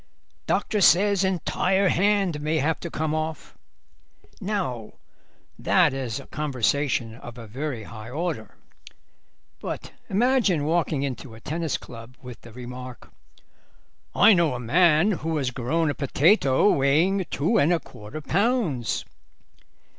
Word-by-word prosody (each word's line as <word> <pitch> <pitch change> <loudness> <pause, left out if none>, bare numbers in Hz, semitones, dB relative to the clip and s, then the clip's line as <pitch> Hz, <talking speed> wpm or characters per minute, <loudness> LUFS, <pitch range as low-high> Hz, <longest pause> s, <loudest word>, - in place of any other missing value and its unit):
Doctor 210 -2 0
says 195 +2 +5
entire 190 +1 +1
hand 195 -5 +1
may 155 +2 0
have 155 +2 0
to 170 - -6
come 155 -1 -2
off.' 155 -1 -4 0.8
Now 180 - -3 0.7
that - - +3
is 130 -2 -3
conversation 130 -4 0
of 120 0 -11
a 115 - -9
very 125 +1 -5
high 110 +1 -10
order. 150 -4 -4 1.0
But - - -6 0.2
imagine 215 - +2
walking 160 -3 0
into 130 -3 -5
a - - -12
tennis 160 +4 -2
club 115 +2 -12
with 125 -2 -11
the 115 - -13
remark: 125 +1 -9 1.0
'I 215 +2 +7
know 170 -7 +2
a - - -4
man 165 - +4
who 160 0 -1
has 130 -4 -1
grown 145 +6 0
a - - -3
potato 145 - +3
weighing 165 +7 +2
two 170 +11 +1
and 155 - +3
a 170 - +2
quarter 105 +6 -10
pounds. 175 - 0
150 Hz, 130 wpm, -25 LUFS, 125-180 Hz, 1.0 s, I